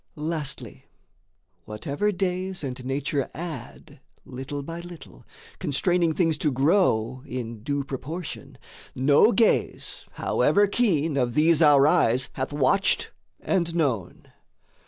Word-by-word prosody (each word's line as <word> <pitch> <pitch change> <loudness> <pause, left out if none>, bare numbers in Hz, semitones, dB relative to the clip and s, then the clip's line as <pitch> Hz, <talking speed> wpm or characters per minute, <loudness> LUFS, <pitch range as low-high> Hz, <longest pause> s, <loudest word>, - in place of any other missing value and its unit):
Lastly 150 -2 -5 0.8
whatever 140 - -2
days 185 -1 -2
and 130 -2 -5
nature 135 +1 -2
add 155 -6 -8 0.3
Little 135 +3 -6
by 165 +4 -6
little, 170 - -12 0.3
constraining 170 +3 +1
things 165 -4 +1
to 150 - +1
grow 130 - +2
In 115 -3 -6
due 140 +4 -2
proportion, 145 +6 -7 0.4
no 145 - +5
gaze 230 -2 0
however 205 +1 +2
keen 165 - +1
Of 125 -2 0
these 160 +1 +4
our 145 -3 +6
eyes 130 -6 +3
hath 130 +1 -3
watched 145 +7 +1 0.3
and 170 -3 -1
known. 130 - -2
150 Hz, 115 wpm, -25 LUFS, 130-175 Hz, 0.8 s, our